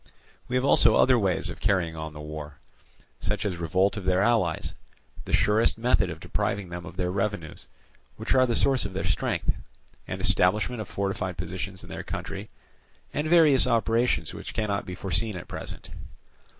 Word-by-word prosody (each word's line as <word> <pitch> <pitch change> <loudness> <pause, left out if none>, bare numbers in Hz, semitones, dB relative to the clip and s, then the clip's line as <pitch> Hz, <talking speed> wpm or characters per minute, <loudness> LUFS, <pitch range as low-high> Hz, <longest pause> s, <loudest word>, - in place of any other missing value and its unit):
"We 125 - -2
have 130 +1 +2
also - - +5
other 130 -2 +5
ways 95 -3 +1
of 85 -2 -6
carrying 90 -6 +1
on 80 -1 -6
the 75 - -9
war, 75 -1 -7 0.6
such 105 +1 -2
as 95 -4 -1
revolt 95 +6 +1
of 100 - -5
their 95 +1 +3
allies, 105 -8 +1 0.5
the - - -6
surest 110 +2 +3
method 120 -5 +2
of 80 -1 -6
depriving 95 +3 -2
them 85 -1 -6
of - - -10
their 90 -1 0
revenues, 95 -5 -3 0.5
which - - -1
are 130 -1 +5
the 120 - 0
source 135 -3 +3
of 100 -1 -5
their 95 - -2
strength, 90 -2 0 0.5
and - - -4
establishment 105 +6 +2
of 105 - -6
fortified 95 -2 -2
positions 90 +2 -5
in - - -11
their - - -4
country, 100 +2 -6 0.6
and 150 +2 -1
various 155 -5 +6
operations 115 +1 +1
which - - -7
cannot 100 -2 -1
be 90 - -5
foreseen 95 +4 -1
at 90 - -7
present. - - -8
95 Hz, 175 wpm, -27 LUFS, 90-115 Hz, 0.6 s, various